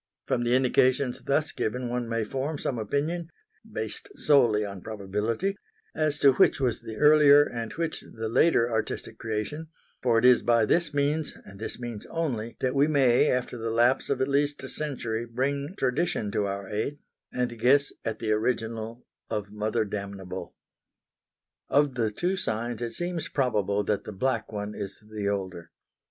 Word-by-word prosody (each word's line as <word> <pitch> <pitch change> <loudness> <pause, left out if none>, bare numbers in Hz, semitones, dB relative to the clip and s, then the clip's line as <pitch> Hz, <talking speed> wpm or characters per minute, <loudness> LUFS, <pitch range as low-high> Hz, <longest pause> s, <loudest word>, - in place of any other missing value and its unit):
From 120 - 0
the 120 +1 +3
indications 130 0 +2
thus 150 +3 +1
given 125 +3 -2
one 120 -1 -2
may 115 -1 0
form 135 +7 -3
some 125 -3 -2
opinion 155 +9 -2 0.4
based 405 - -4
solely 115 -7 +4
on 100 -2 -7
probability 110 - -2 0.4
as 155 -2 0
to 140 -2 +6
which - - +4
was 125 -4 0
the 110 -1 -7
earlier 150 +1 +7
and 115 -5 -5
which 165 +1 -3
the 110 0 -4
later 115 0 +4
artistic 110 -2 -3
creation, 115 +9 -3 0.3
for 120 -2 +3
it 115 - +3
is 125 -1 +7
by 115 -2 +3
this 165 +6 +2
means 145 +1 0
and 100 0 -12
this 110 - -5
means 120 -4 -6
only 120 -9 -3
that 130 -1 +1
we 140 +2 +4
may 135 -5 +4
after 125 -1 -1
the 115 0 -2
lapse 120 +3 +2
of 135 -2 0
at 130 - +2
least 145 +1 +1
a - - -6
century 120 -6 -3
bring 140 +7 -2
tradition 125 -5 0
to 100 0 0
our 100 0 -4
aid, 110 +9 -2 0.3
and 120 -2 -2
guess 140 +5 +4
at 110 -1 -2
the 110 -2 -2
original 115 +1 -1 0.2
of 105 -2 -3
Mother 110 +2 -1
Damnable. 100 -3 -6 1.1
Of 145 -1 +3
the 115 -3 0
two 175 - -1
signs 115 -3 -2
it 120 -1 -3
seems 175 -2 -3
probable 105 -7 +1
that 105 0 -1
the - - -6
black 115 +3 -1
one 105 0 -4
is 100 -2 -6
the 105 -2 -2
older. 95 -4 -4
120 Hz, 170 wpm, -27 LUFS, 110-140 Hz, 1.1 s, earlier